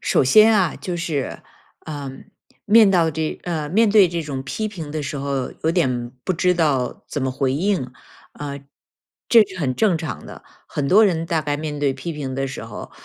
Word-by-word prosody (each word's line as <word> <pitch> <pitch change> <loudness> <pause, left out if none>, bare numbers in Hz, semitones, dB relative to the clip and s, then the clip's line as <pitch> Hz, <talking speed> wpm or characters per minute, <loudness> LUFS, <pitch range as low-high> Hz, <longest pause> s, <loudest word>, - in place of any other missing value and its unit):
首 - - +2
先 215 - +6
啊， 180 -5 +1
就 180 -2 -4
是， 160 -5 -3 0.4
嗯， 140 -3 -7 0.4
面到 195 -7 +5
这 155 +1 -3
呃， 160 -4 -3
面 220 +6 +3
对 205 -3 +7
这 170 -1 -3
种 135 -3 -5
批 215 +11 -3
评 165 -8 -7
的 155 0 -3
时 140 +1 -4
候， 135 -2 -2
有 160 - +3
点 125 -8 0
不 - - 0
知 180 +1 +2
道 140 -7 0
怎 145 - -3
么 130 - 0
回 130 0 -1
应， 180 0 0 0.5
啊， 140 -1 -6 0.7
这 230 -2 +8
是 185 -2 -11
很 130 -6 -1
正 200 - +2
常 160 - -6
的。 - - -11 0.2
很 140 -1 -2
多 215 +6 +6
人 165 -3 -1
大 165 -1 0
概 145 -1 -2
面 150 -1 -5
对 140 -2 +1
批 140 +6 -5
评 135 -3 -5
的 135 0 -1
时 130 -3 -7
候， 115 -2 -9
155 Hz, 215 characters per minute, -21 LUFS, 135-180 Hz, 0.7 s, 这